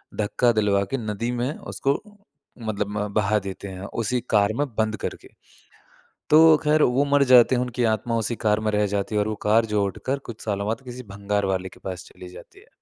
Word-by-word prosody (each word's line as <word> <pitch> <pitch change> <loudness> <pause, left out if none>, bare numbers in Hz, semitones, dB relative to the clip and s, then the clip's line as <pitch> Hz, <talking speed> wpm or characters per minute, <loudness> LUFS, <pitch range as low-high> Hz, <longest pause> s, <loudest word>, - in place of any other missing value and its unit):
धक्का 120 +3 +1
दिलवा 100 -2 +2
के 135 - 0
नदी 110 +1 -3
में 125 +5 -2
उसको 140 +1 -2 0.6
मतलब 105 -2 -2
म 105 0 -1
बहा 105 0 +2
देते 100 0 -7
हैं, 95 0 -8
उसी 115 +4 -2
कार 105 0 +3
में 145 - +2
बंद 110 0 0
करके। - - -6 1.0
तो 160 0 +7
ख़ैर, 150 0 +3
वो 130 +3 +3
मर 140 0 +3
जाते 125 +1 +7
हैं, 125 - +1
उनकी 125 0 -3
आत्मा 115 +2 -2
उसी 115 +1 -2
कार 105 0 +3
में 105 - +1
रह 105 0 +2
जाती 100 +1 -2
है 105 - +3
और 105 - -1
वो 110 - -2
कार 110 +2 +4
जो 105 -1 +2
उठकर 130 +8 -3
कुछ 110 - -8
सालों 100 -1 -2
बाद 115 +3 -2
किसी 125 0 -8
भंगार 100 0 -2
वाले 95 -1 -2
के - - -17
पास 90 -2 -5
चली 90 - -12
जाती 375 - -14
है। 440 - -21
110 Hz, 215 wpm, -24 LUFS, 100-125 Hz, 1.0 s, तो